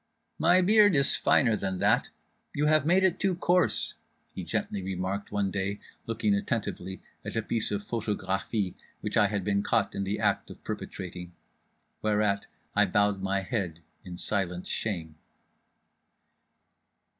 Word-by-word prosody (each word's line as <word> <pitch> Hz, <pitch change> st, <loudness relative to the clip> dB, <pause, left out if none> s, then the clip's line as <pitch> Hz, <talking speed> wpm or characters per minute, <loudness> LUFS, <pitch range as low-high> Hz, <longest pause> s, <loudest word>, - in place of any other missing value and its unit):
"My 175 Hz, +4 st, +5 dB
beard 205 Hz, 0 st, +6 dB
is 140 Hz, -1 st, +3 dB
finer 115 Hz, -4 st, +3 dB
than 95 Hz, -2 st, -2 dB
that; -, -, +2 dB, 0.5 s
you 150 Hz, -, +1 dB
have 155 Hz, -1 st, +3 dB
made 185 Hz, +3 st, +4 dB
it 190 Hz, -1 st, +2 dB
too 190 Hz, -2 st, +1 dB
coarse," 180 Hz, +1 st, +2 dB, 0.4 s
he -, -, -5 dB
gently 100 Hz, -, -2 dB
remarked 95 Hz, +2 st, -3 dB
one 100 Hz, -2 st, 0 dB
day, 100 Hz, +1 st, -2 dB, 0.3 s
looking 110 Hz, -2 st, +1 dB
attentively 100 Hz, -3 st, -2 dB, 0.2 s
at -, -, -5 dB
a 115 Hz, -, 0 dB
piece 115 Hz, +1 st, -1 dB
of 100 Hz, 0 st, -2 dB
photographie 105 Hz, -3 st, -1 dB, 0.3 s
which -, -, -3 dB
I 105 Hz, -, +5 dB
had 100 Hz, -1 st, -2 dB
been 100 Hz, +1 st, +1 dB
caught -, -, +1 dB
in 100 Hz, -, -2 dB
the 100 Hz, +2 st, -2 dB
act 100 Hz, -2 st, +1 dB
of -, -, -12 dB
perpetrating: 90 Hz, -1 st, -6 dB, 0.7 s
whereat 105 Hz, -2 st, +1 dB, 0.3 s
I -, -, +5 dB
bowed 105 Hz, -1 st, +2 dB
my 95 Hz, 0 st, 0 dB
head 95 Hz, -5 st, -3 dB, 0.2 s
in 90 Hz, -1 st, -8 dB
silent 90 Hz, -1 st, 0 dB
shame. 80 Hz, -8 st, -3 dB
100 Hz, 145 wpm, -28 LUFS, 95-115 Hz, 0.7 s, beard